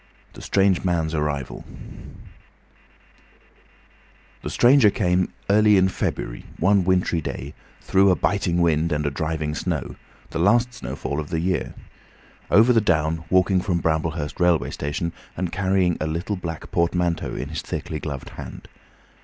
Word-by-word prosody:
THE - - -11
STRANGE 95 -2 +2
MAN'S 85 -3 0
ARRIVAL 75 -4 -3 2.8
The - - -5
stranger 125 -2 +5
came 90 -2 +1 0.2
early 105 0 +5
in 95 0 +4
February, - - -4
one 95 +2 +3
wintry 90 -2 +1
day, 70 -1 -6 0.3
through 95 +1 +3
a 90 - +4
biting 90 -3 0
wind 80 -1 +2
and 75 0 -1
a 70 - 0
driving 75 0 -2
snow, 80 -4 -3 0.4
the 80 - -3
last 120 +7 +3
snowfall 70 - -4
of 75 - -5
the 80 - -1
year, 90 +2 -1 0.7
over 115 +4 +6
the 115 - +4
down, 80 -3 0
walking 95 0 +3
from 90 -2 0
Bramblehurst 80 -1 -2
railway 90 -2 +2
station, 80 +4 -3 0.2
and 90 -1 -2
carrying 95 -2 +1
a 80 - 0
little 85 +6 -2
black 85 -4 -7
portmanteau 85 0 0
in - - -5
his - - -4
thickly 75 - -5
gloved 70 -4 -6
hand. - - -10
85 Hz, 145 wpm, -23 LUFS, 80-95 Hz, 2.8 s, over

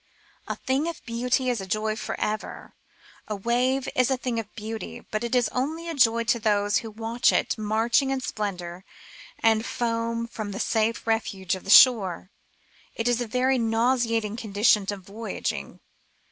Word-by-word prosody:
" - - -31
A - - -2
thing 270 +4 -1
of 335 -2 -6
beauty 250 +2 0
is 245 -5 0
a 190 - -7
joy 215 +2 -1
for 220 - -5
ever." 215 0 -4 0.5
A 215 - -3
wave 250 +6 0
is 255 0 +3
a 265 - +1
thing 245 -2 -2
of 215 -2 -7
beauty, 220 +1 -6
but 215 +2 -2
it 235 +1 -1
is 245 -2 +3
only 315 +6 -3
a 335 - -3
joy 235 -4 +3
to 235 +1 +1
those 205 -1 +2
who 225 - -7
watch 225 +3 +1
it - - +1
marching 225 +5 +1
in 270 0 0
splendour 185 -7 -4 0.5
and 220 -1 +3
foam 230 -1 -2
from 215 -3 -6
the 200 - -5
safe 225 0 0
refuge 200 -5 -1
of 190 - -5
the - - -8
shore. 195 -6 +6 0.6
It 230 - -2
is 245 0 +2
a 240 - -2
very 255 +3 +1
nauseating 230 -1 +1
condition 210 -2 +2
of 200 -2 -4
voyaging. 215 +4 -5
230 Hz, 175 wpm, -25 LUFS, 210-245 Hz, 0.6 s, shore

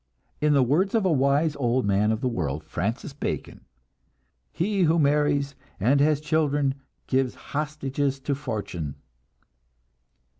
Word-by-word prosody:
In 150 0 +4
the 140 -2 +5
words 175 - +2
of 220 -4 +2
a 185 - +3
wise 145 +2 +2
old 125 -2 +1
man 100 +2 +2
of 110 +1 -1
the 130 - 0
world, 80 - -2
Francis 110 - -3
Bacon, 140 - -5 0.9
"He 195 +3 0
who 165 -1 +4
marries 145 -2 +2 0.3
and 130 +8 +3
has 150 0 +3
children 145 -2 +1 0.3
gives 130 -1 0
hostages 145 -2 -2
to 140 - -1
fortune." 105 - -4
140 Hz, 135 wpm, -25 LUFS, 125-150 Hz, 0.9 s, the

